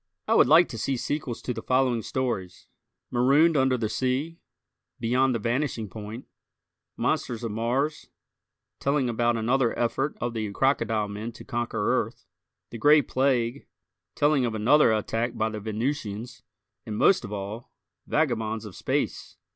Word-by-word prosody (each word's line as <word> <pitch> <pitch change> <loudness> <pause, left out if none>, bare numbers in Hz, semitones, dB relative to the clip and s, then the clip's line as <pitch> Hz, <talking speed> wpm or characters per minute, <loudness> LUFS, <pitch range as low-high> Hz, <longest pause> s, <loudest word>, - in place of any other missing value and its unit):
I - - +3
would - - +6
like 160 +5 +7
to 115 - -6
see 135 +3 -1
sequels 130 -2 -3
to 125 - -2
the 115 - -6
following 125 -2 +1
stories: 115 -7 -3 0.5
"Marooned 140 +7 +4
Under 130 -2 +3
the 115 -2 -1
Sea," 130 +8 -2 0.6
"Beyond 125 +2 +2
the - - +2
Vanishing 115 -1 -2
Point," 110 +4 -8 0.7
"Monsters 120 -1 -1
of 115 - -2
Mars," 125 +7 -1 0.7
telling 140 -2 +1
about 120 0 +1
another 120 +2 +1
effort 135 +4 -1
of 120 -1 -2
the 110 -3 -3
crocodile 115 -4 +1
men 105 +3 -5
to - - -11
conquer 120 -3 0
Earth, - - -13 0.5
"The 115 - -7
Gray 150 +3 +6
Plague," 130 -1 0 0.5
telling 145 -2 +3
of 115 -2 -1
another 120 +4 +5
attack 115 +2 -1
by 110 0 +1
the 110 -1 -5
Venusians, 115 +1 -4 0.4
and, 105 -2 -5
most 190 - +4
of - - -7
all, 105 +3 -6 0.4
"Vagabonds 115 -7 0
of 105 - -9
Space." - - -2
120 Hz, 150 wpm, -26 LUFS, 110-135 Hz, 0.7 s, like